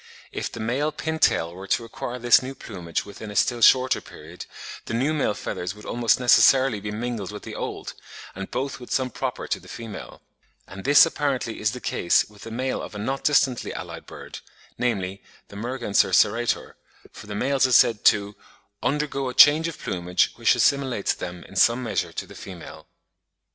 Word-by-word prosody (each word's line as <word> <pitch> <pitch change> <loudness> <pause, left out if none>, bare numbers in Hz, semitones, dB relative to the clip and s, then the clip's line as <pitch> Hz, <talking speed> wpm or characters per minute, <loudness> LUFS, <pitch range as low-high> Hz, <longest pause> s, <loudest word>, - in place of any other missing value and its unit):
If - - -4
the - - -8
male 130 +7 -1
pin 160 +1 -4
tail 85 - +2
were 95 +2 -9
to 115 - 0
acquire 120 +2 -6
his 120 0 +5
new 130 +1 -7
plumage 90 -9 -5
within 105 +1 -9
a 105 - -8
still 120 +4 +1
shorter 130 +2 +5
period, 80 +4 -11 0.4
the 115 - -3
new 135 +6 +1
male 140 -9 0
feathers 90 0 -5
would 105 - -13
almost 120 -1 +1
necessarily 125 0 +5
be 105 +1 -6
mingled 110 -2 -4
with 105 - -9
the - - -8
old, - - -5 0.4
and 100 0 -7
both 135 0 -3
with 125 - -11
some 130 -1 0
proper - - -4
to - - -2
the - - -17
female; 115 -3 -9 0.4
and 95 0 -10
this 145 +2 +8
apparently 140 -7 -2
is 105 0 0
the 125 - -6
case 85 - +2
with 105 -1 -18
the - - -8
male 130 +3 -2
of 105 - -8
a - - -4
not 135 +7 -3
distantly 135 -4 +2
allied - - -8
bird, - - -10 0.4
namely 100 -6 -2 0.3
the - - -12
Merganser 120 -1 0
serrator, 115 +3 +2 0.4
for - - -12
the 105 - -6
males 135 +4 +2
are - - -4
said 115 -3 +4
to 100 -1 +3 0.5
"undergo 140 -2 -1
a 125 - -7
change 155 +3 +7
of 165 - -6
plumage, 90 0 0
which - - +3
assimilates 135 -7 +1
them 90 -1 -7
in 95 - -15
some 115 +6 +4
measure 115 - -2
to - - -5
the - - -14
female." - - -10
115 Hz, 190 wpm, -24 LUFS, 100-130 Hz, 0.5 s, this